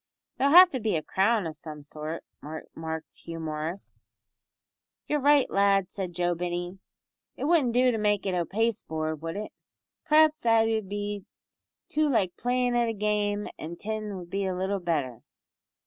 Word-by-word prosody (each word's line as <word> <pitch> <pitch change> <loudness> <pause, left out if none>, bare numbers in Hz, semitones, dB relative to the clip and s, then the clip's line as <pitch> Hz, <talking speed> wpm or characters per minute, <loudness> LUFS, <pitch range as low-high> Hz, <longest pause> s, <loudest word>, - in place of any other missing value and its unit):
"There'll 275 +1 +3
have 365 0 +10
to 260 - -2
be 215 -5 0
a 155 - -1
crown 205 +1 +2
o' 160 - -3
some 150 -1 -10
sort," 155 +2 -6 0.2
remarked 160 +1 -7
Hugh 165 -1 -8
Morris. 160 +4 -5 1.0
"You're 295 - 0
right, 285 -1 +5
lad," 195 -1 +2
said 185 -3 -4
Joe 175 0 +1
Binney. 175 +2 -4 0.6
"It - - -5
wouldn't 285 -6 +3
do 250 0 +5
to 225 - -2
make 210 -2 +1
it 190 - 0
o' 175 -1 +1
pasteboard, 160 -7 -2
would 165 +1 -4
it? 210 - -5 0.5
P'r'aps 310 0 +5
that 225 -3 +3
'ud 220 -3 -1
be 205 -1 -4 0.6
too 305 0 +1
like 195 -9 +1
playin' 245 0 0
at 240 -1 +2
a - - -1
game, 210 0 0
an' 165 +2 -6
tin 215 +1 -4
would 175 -2 -10
be 195 -1 -1
little 190 +2 -1
better." 145 -9 -2
200 Hz, 165 wpm, -27 LUFS, 170-230 Hz, 1.0 s, have